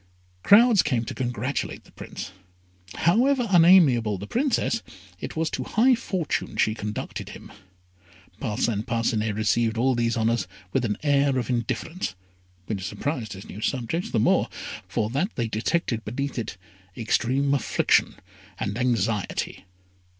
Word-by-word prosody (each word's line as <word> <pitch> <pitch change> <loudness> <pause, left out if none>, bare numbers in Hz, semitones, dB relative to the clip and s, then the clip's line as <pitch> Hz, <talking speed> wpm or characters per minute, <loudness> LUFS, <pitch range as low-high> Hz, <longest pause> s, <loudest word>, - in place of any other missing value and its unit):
Crowds 220 - +6
came 125 -6 0
to - - -5
congratulate 125 +1 -3
the - - -20
Prince. - - -8 0.6
However 245 +8 +3
unamiable 160 - +6
the 100 - -7
Princess, 240 - 0 0.4
it - - -6
was 160 0 -1
to - - -3
high 250 +4 +3
fortune 185 -8 -2
she 110 - +3
conducted 105 -1 -5
him. - - -11 0.9
Parcin 105 -1 -1
Parcinet 115 -2 -1
received 110 +1 +1
all 130 +3 +3
these 115 -1 0
honours 115 -2 +1 0.3
with 130 -2 +1
an 105 -2 -1
air 140 -2 +3
of 125 -1 -1
indifference, 120 - -2 0.5
which 100 -2 -4
surprised 125 +1 -3
his 95 0 -10
new 105 - -9
subjects 135 - -2
the 115 - 0
more, - - +3 0.4
for 105 - -1
that 155 - -1
they 120 -2 -1
detected 115 +2 -1
beneath 135 +4 -3
it 105 -5 -5 0.4
extreme 130 +5 +1
affliction 140 - +2 0.4
and 100 +4 -2
anxiety. 115 -5 -1
120 Hz, 135 wpm, -25 LUFS, 110-160 Hz, 0.9 s, Crowds